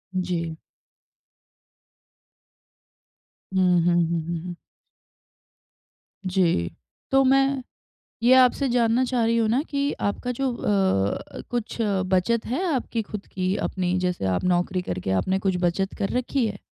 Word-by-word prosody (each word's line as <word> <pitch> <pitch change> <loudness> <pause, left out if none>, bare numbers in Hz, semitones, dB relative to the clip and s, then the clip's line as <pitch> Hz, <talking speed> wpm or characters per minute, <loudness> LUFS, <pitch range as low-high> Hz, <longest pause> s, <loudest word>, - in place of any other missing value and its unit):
जी। 170 -3 -2 3.0
हुँ, 185 - +4 0.2
हुँ, 175 - +4
हुँ, 170 -1 -1
हुँ, 170 -1 -3
हुँ। 175 -1 -6 1.7
जी। 175 - +1 0.4
तो 270 0 +5
मैं, 270 0 +3 0.6
ये 250 +2 +6
आपसे 260 +1 +4
जानना 240 +1 +2
चाह 245 -2 0
रही 230 +1 +2
हूँ 225 -1 +2
ना 250 +6 +2
कि 280 0 0
आपका 245 +5 -1
जो 265 0 -1
अ, 190 - 0
कुछ 240 -2 -3 0.3
बचत 190 +5 +1
है 290 +11 -1
आपकी 230 -2 -2
खुद 205 -1 -8
की 185 0 -2
अपनी, 180 -1 -1
जैसे 180 - -1
आप 95 -1 0
नौकरी 180 +1 +1
करके 95 - -4
आपने 190 +1 0
कुछ 190 -2 0
बचत 190 +3 0
कर 195 - -1
रखी 255 -1 0
है? 205 -2 -5
200 Hz, 135 wpm, -24 LUFS, 180-245 Hz, 3.0 s, ये